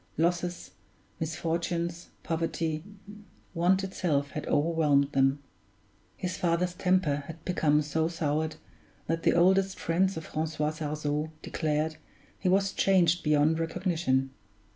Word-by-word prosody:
Losses, 175 +2 -1 0.5
misfortunes, 170 +1 -2 0.2
poverty, 165 -1 -2 0.7
want 185 +3 +2
itself 150 -7 -1
had 150 - -5
overwhelmed 145 -3 +2
them; 135 +1 +2 0.7
his 180 -1 -3
father's 175 +1 +1
temper 180 -5 +2
had 165 0 -10
become 150 -4 +2
so 160 +2 0
soured, 155 -1 -1 0.5
that 165 +1 -1
the - - +3
oldest 190 +2 +3
friends 185 +2 +1
of 160 - -6
Francois 155 -1 -2
Sarzeau 150 0 -2
declared 155 0 -1 0.4
he 185 - +1
was 195 +1 +2
changed 175 -3 +3
beyond 150 +1 +3
recognition. 165 -6 0
165 Hz, 115 wpm, -29 LUFS, 150-175 Hz, 0.7 s, the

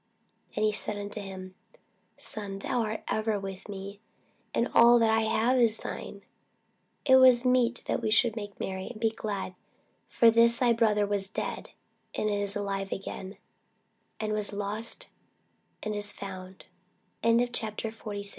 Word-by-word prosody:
And 215 - +2
he 215 - +3
said 210 0 -3
unto 205 +1 -5
him, 190 -1 -8 0.6
Son, 200 -2 -7
thou 245 +5 -2
art 215 -1 -3
ever 220 -1 0
with 195 0 -7
me, 200 0 -7 0.5
and 235 - +1
all 235 +1 +8
that 225 -1 +4
I 220 0 +3
have 225 +3 +2
is 225 -2 +3
thine. - - -7 0.8
It 260 -2 +7
was 255 -1 +7
meet 250 -1 +3
that - - -1
we 220 - 0
should 225 +1 +3
make 205 -2 -7
merry, 190 0 -4
and 235 - -8
be 225 0 +2
glad: 205 -4 -4 0.5
for 230 -1 +5
this 235 +1 +5
thy 240 -1 +4
brother 215 -3 +3
was 200 -1 -1
dead, - - -4 0.5
and 215 - 0
is 205 0 -1
alive 195 -1 -2
again; 190 0 -6 0.8
and 215 -1 -1
was 210 -1 -1
lost, 210 - -4 0.8
and 215 -1 -2
is 205 0 -2
fo 185 -1 -8
215 Hz, 145 wpm, -29 LUFS, 200-230 Hz, 0.8 s, all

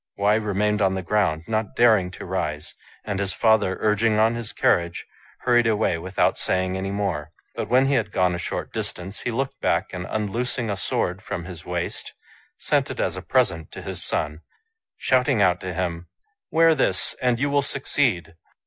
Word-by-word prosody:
Wei 105 +2 +3
remained 105 0 0
on 95 -1 +3
the 95 - -3
ground, 90 -6 +1
not 110 -2 -2
daring 110 -6 +4
to 90 - -9
rise; 75 0 -3 0.3
and 105 -2 -2
his 100 -1 -1
father, 110 -4 +3
urging 110 +1 +2
on 110 +1 +4
his 115 -2 -4
carriage, 85 0 +1 0.4
hurried 120 -2 +3
away 105 -6 +1
without 90 +3 0
saying 95 0 0
any 95 +1 -3
more. 100 -7 -2 0.2
But - - -4
when 130 +2 +5
he 140 - +2
had 110 -6 +1
gone 90 -2 +2
a 85 - -3
short - - -4
distance, 95 +3 -5
he - - -3
looked 135 +4 -3
back, - - 0
and 90 -1 -5
unloos 110 +4 -2
ing 115 -4 -1
a - - -1
sword 90 0 -1
from 100 -5 -5
his 85 -3 -9
waist, 90 -1 -4 0.4
sent - - +1
it - - -6
as - - 0
a - - -5
present 80 -1 +1
to - - -8
his - - -4
son, 75 +1 -1 0.6
shouting 130 -1 +2
out 90 -3 +3
to 95 - -4
him, 85 -1 -3 0.2
" 160 - -51
Wear 165 0 +5
this 140 - +1
and 125 -2 +2
you 140 +1 0
will 145 0 +3
succeed." 125 - 0
105 Hz, 195 wpm, -24 LUFS, 90-115 Hz, 0.6 s, when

